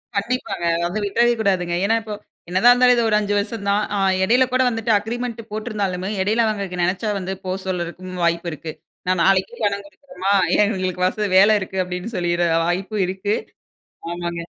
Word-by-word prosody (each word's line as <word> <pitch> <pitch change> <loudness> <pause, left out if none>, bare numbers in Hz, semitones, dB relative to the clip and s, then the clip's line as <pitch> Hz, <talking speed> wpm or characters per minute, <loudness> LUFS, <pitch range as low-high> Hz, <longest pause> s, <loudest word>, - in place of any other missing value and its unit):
கண்டிப்பாங்க. 205 -3 -2
அது 170 - -1
வந்து 210 +5 -3
விட்றவே 235 +4 +3
கூடாதுங்க. 185 -5 +1
ஏன்னா, 225 +3 +3
இப்ப 220 -1 -7 0.4
என்னதான் 190 +7 +5
இருந்தாலும் 250 0 +5
இது 235 -1 +1
ஒரு 210 - +3
5 205 -1 -1
வருஷம்தான். 205 -1 -1
ஆ 200 - 0 0.2
இடையில 245 +6 +4
கூட 255 0 +2
வந்துட்டு 225 -1 -1
அக்ரீமெண்ட் 235 +3 -4
போட்டிருந்தாலுமே, 205 -4 -3
இடையில 215 +4 +2
அவுங்களுக்கு 200 -4 -2
நினைச்சா 190 +5 0
வந்து 190 0 -4
போ 185 - -2
சொல்றதுக்கும் 180 0 -4
வாய்ப்பு 170 0 0
இருக்கு. 155 +1 -7 0.3
நான் 185 -2 +2
நாளைக்கே 195 +4 +2
பணம் 200 -1 0
குடுக்கணுமா 200 -2 -4 0.2
ஏன் - - +5
எங்களுக்கு 185 -3 -2
வச 210 +2 -1
வேல 205 +3 +6
இருக்கு 190 -1 -3
அப்பிடின்னு 180 +5 -6
சொல்லிற 175 0 +1 0.2
வாய்ப்பு 185 +5 -2
இருக்கு. 190 +3 -2 0.8
ஆமாங்க. 170 0 -4
200 Hz, 170 wpm, -21 LUFS, 180-220 Hz, 0.8 s, வேல